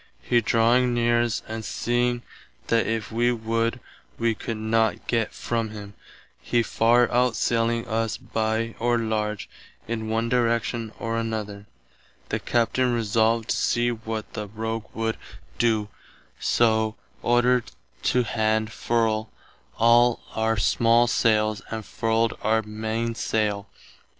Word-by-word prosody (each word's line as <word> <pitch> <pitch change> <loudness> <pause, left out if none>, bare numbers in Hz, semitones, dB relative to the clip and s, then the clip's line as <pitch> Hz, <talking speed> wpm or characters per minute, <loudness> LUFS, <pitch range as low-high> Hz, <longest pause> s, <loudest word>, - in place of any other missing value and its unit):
He 120 -1 +3
drawing 120 +3 +3
near 120 0 +3
us 120 0 -1
and 110 0 -5
seeing 120 +1 0 0.5
that 115 -1 +2
if 110 -1 -2
[wee] 120 +2 +2
would, 115 +1 -1 0.4
[wee] 115 -1 +1
could 110 +1 -5
not 110 -2 0
gett 115 -2 0
from 115 -2 -2
him, 100 -1 -9 0.5
he 120 -1 +1
far 120 +2 +3
outsailing 115 -1 +1
us 115 0 -1
by 110 +1 -2
or 120 +1 +2
large 105 -2 -2 0.4
[in 110 -1 -3
one 115 +1 0
direction 115 -2 0
or 115 0 -2
another], 105 -2 -4 0.6
the - - -1
Captain 125 +2 +1
resolved 115 0 +1
to - - +2
see 120 0 +1
what 110 -1 -5
the 105 -2 -4
rogue 110 +1 -4
would 115 0 -1 0.4
doe, 110 -3 +2 0.5
soe 110 -2 +2 0.3
ordered 120 0 +2 0.3
to 125 0 +2
hand 110 -1 0
[furl] 115 -2 0 0.5
all 120 +1 +4
our 110 0 0
small 115 +3 +4
sailes 110 -3 +2
and 110 -2 -5
furled 115 0 0
our 110 0 +2
mainesaile. 110 -1 -2
115 Hz, 125 wpm, -25 LUFS, 110-120 Hz, 0.6 s, all